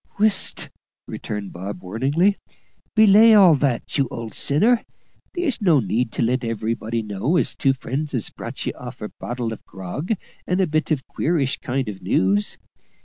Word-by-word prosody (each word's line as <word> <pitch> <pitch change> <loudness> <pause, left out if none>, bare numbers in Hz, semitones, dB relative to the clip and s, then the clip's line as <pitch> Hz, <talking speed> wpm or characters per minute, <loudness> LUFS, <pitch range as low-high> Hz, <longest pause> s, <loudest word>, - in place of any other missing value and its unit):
"Whisht!" 215 0 +3 0.4
returned 105 -2 -6
Bob 95 +1 -7
warningly. 140 - +1 0.6
"Belay 220 +1 +7
all 190 -5 +8
that, 140 -1 -1
you 135 - +2
old 115 -3 -7
sinner; 220 - +2 0.5
there's 335 -10 -1
no 170 -8 +4
need 115 +1 -1
to - - -1
let 125 +2 0
everybody 115 0 -2
know 105 - -1
as - - 0
two 135 -1 +2
friends 140 +3 -4
has 120 -6 -2
brought - - -7
ye - - -2
off - - -9
a - - -4
bottle 120 -2 -3
of - - -11
grog 95 - -4 0.3
and 180 +1 0
a 190 - +4
bit 155 -1 -1
of 150 -5 -1
queerish 145 -5 -1
kind 130 +1 -2
of 100 -2 -6
news. 95 +2 +1
130 Hz, 165 wpm, -22 LUFS, 110-175 Hz, 0.6 s, all